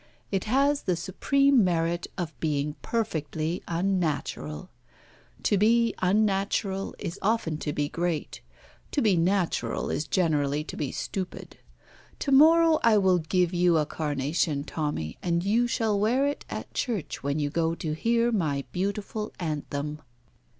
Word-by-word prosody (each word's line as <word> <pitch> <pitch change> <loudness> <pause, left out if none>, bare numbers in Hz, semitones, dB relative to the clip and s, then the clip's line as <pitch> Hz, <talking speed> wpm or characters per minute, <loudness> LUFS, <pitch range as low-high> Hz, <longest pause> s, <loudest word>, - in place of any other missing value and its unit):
It 195 -2 -1
has 275 +5 +2
the 180 - 0
supreme 270 - +2
merit 170 -1 0
of 170 -4 -3
being 150 -2 -1
perfectly 160 -6 -2
unnatural. 165 - -2 0.7
To 205 - +2
be 230 +2 +4
unnatural 195 0 0
is 170 - -5
often 195 -7 0
to 150 - -2
be 145 0 -1
great. 170 0 -3 0.5
To 285 - +1
be 205 -4 +4
natural 180 +1 0
is 150 - -2
generally 150 -3 +1
to - - -8
be 145 -4 -3
stupid. 185 -2 -5 0.6
To 280 - -2
morrow 320 +3 +6
I 230 -2 +5
will 190 -3 +4
give 175 +2 +1
you 175 -1 +3
a 155 - +2
carnation, 150 0 -1
Tommy, 145 - -3
and 170 -1 0
you 225 +5 +2
shall 220 -3 0
wear 245 +7 +2
it 285 0 -2
at - - -6
church 220 - -3
when 140 +1 -1
you 145 -1 -1
go 165 +1 0
to 155 -2 -3
hear 230 +7 +1
my 150 -10 0
beautiful 200 +3 -3
anthem." 150 -2 -3
180 Hz, 145 wpm, -27 LUFS, 155-215 Hz, 0.7 s, morrow